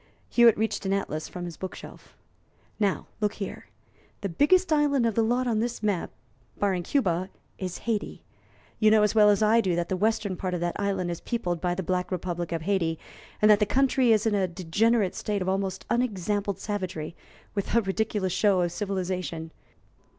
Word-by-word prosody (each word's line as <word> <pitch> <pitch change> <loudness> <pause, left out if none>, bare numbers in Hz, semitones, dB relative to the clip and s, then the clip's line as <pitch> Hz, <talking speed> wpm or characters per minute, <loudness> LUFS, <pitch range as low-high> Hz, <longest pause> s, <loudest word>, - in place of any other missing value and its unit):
Hewitt 235 -2 +6
reached 220 +1 -1
an 195 - +1
atlas 155 -6 -2
from 180 -1 -6
his 170 -2 -7
book 185 - -6
shelf. - - -13 0.6
"Now, 200 -3 0
look 210 -1 0
here: 195 - -6 0.5
the 200 - -2
biggest 320 - +3
island 285 -4 +3
of 230 - +1
the 230 - +2
lot 245 +3 +1
on 230 -3 +1
this 235 -1 -3
map, 205 -5 0 0.5
barring 195 -3 +1
Cuba, 185 -5 0 0.3
is 185 -2 -4
Hayti. 225 -3 -2 0.6
You 215 - +5
know 215 -1 +5
as 210 - +2
well 210 -1 +6
as 205 +1 +3
I 225 +2 +5
do 185 -5 0
that 175 0 -2
the 190 - 0
western 210 0 0
part 180 0 -3
of - - -2
that 175 0 -2
island 195 -3 -1
is 170 - -5
peopled 175 -8 -2
by 175 -1 0
the 190 - -3
black 180 +2 -1
republic 175 -1 -3
of 165 -1 -2
Hayti, 170 -4 0 0.5
and 215 - +8
that 205 - +6
the 210 - +3
country 260 -1 +3
is 215 -1 +3
in 220 - +2
a 195 -2 +2
degenerate 190 +4 +1
state 205 -3 -2
of - - -6
almost 190 0 -2
unexampled 205 -4 -1
savagery, 180 -6 -4 0.4
with 200 +1 -2
a 235 - +5
ridiculous 195 -2 -1
show 200 -4 +3
of 175 -1 0
civilization. 180 -4 -3
200 Hz, 195 wpm, -27 LUFS, 180-220 Hz, 0.6 s, and